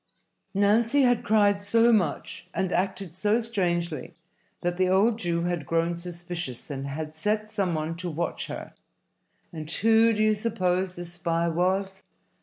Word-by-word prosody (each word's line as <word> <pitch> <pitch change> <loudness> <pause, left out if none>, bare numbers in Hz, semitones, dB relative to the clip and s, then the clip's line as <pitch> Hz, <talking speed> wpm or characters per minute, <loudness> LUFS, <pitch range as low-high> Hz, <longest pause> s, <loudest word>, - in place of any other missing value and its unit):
Nancy 225 +7 +3
had 245 -2 +3
cried 205 -2 +3
so 230 +3 +4
much 180 -9 -1
and 190 -1 0
acted 190 -2 -2
so 210 +4 +2
strangely 175 - -2 0.5
that 175 0 -1
the 185 0 +2
old 215 +5 +3
Jew 170 -3 -1
had 175 -5 -2
grown 165 +1 +1
suspicious 175 -6 -5
and 135 0 -4
had 155 +2 -5
set 210 +5 -1
some 195 -6 0
one 155 +1 -2
to 180 0 -4
watch 170 +2 -3
her. - - -7 0.8
And 155 -2 -6
who 225 +5 +4
do 215 -1 +1
you 215 0 +4
suppose 185 -4 -1
this 175 0 -7
spy 170 -1 0
was? 190 +3 0
185 Hz, 155 wpm, -26 LUFS, 170-210 Hz, 0.8 s, so